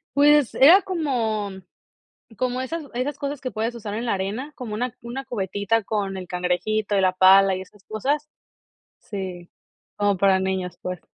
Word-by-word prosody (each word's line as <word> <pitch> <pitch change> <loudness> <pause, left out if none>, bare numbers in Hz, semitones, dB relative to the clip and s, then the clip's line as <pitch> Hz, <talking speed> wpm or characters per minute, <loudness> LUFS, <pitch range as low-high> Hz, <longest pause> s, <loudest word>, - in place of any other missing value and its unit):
Pues, 290 -2 +5
era 340 +9 +8
como 235 - -1 0.9
como 255 0 -1
esas 310 +4 -4
esas 255 +4 -2
cosas 280 -1 -4
que 255 - -3
puedes 225 +3 -2
usar 210 -3 -5
en 235 +2 -3
la 230 - +1
arena, 210 +10 -3
como 230 -4 -6
una 245 +2 -3
una 245 +3 -6
cubetita 205 -1 -1
con 200 -3 -2
el 185 -1 -7
cangrejito 180 +4 -1
y 195 - +3
la 185 -1 +4
pala 190 +1 +6
y 185 - -5
esas 190 +1 -15
cosas. 285 +8 -2 0.7
Sí, 185 -4 -7 0.5
como 205 -1 +2
para 190 0 +4
niños, 185 -2 -2
pues. 180 -1 -5
215 Hz, 165 wpm, -23 LUFS, 190-255 Hz, 0.9 s, era